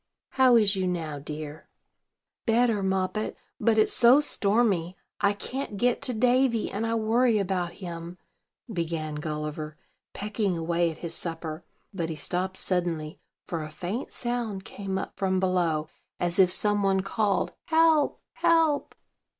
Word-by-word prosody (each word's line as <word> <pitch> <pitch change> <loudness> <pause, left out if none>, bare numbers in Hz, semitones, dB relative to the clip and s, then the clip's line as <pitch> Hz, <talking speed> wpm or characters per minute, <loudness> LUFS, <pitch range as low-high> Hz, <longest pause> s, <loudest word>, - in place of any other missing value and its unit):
How 260 -2 +5
is 210 -3 +4
you 190 -1 0
now, 160 -5 -3
dear?" 150 +1 -7 0.8
"Better, 230 -2 +3
Moppet; 190 +2 -1 0.2
but, 225 -2 +3
it's 215 - +4
so 245 +3 +7
stormy, 200 - +1 0.2
I 200 0 +3
can't 230 +1 -5
get 245 +3 +1
to 250 - 0
Davy; 245 0 +2
and 220 +3 -2
I 230 - 0
worry 230 +1 +3
about 180 -3 -1
him," 170 -1 -7 0.6
began 165 -3 -2
Gulliver, 150 0 -4 0.4
pecking 205 -3 -1
away 170 +1 +1
at 160 - -7
his 165 - -2
supper: 165 -1 -4 0.3
but 170 -4 -2
he 160 - -3
stopped 185 +5 -2
suddenly, 170 -4 -2 0.3
for 165 -2 -3
a 155 - -6
faint 185 - -5
sound 235 -5 -3
came 195 -1 -4
up - - -4
from 190 -2 +1
below, 175 -5 +1 0.3
as 175 +1 -1
if 185 -2 +7
some 205 +2 +2
one 195 -1 +2
called, 195 -1 0
"Help, 320 -2 +3
help!" 330 -3 +2
190 Hz, 145 wpm, -27 LUFS, 170-225 Hz, 0.8 s, so